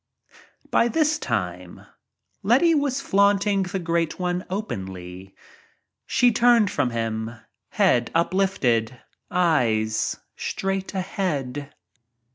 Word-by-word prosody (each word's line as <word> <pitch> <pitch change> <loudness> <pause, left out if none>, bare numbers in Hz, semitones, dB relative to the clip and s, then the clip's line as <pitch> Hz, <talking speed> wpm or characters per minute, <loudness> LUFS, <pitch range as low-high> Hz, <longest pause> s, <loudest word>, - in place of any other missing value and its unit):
By 235 - +4
this 305 +3 +1
time 90 -6 -4 0.6
Letty 265 - +4
was 285 -3 0
flaunting 200 -1 +2
the 190 +1 -3
Great 170 -2 -1
One 180 0 -1
openly. 95 - -6 0.7
She 245 -1 +4
turned 235 -3 +4
from 140 -4 0
him, 115 0 -3 0.3
head 120 -1 +2
uplifted, 140 -11 +1 0.3
eyes 115 -11 +1 0.2
straight 195 0 -3
ahead. 145 -8 -3
175 Hz, 90 wpm, -24 LUFS, -, 0.7 s, By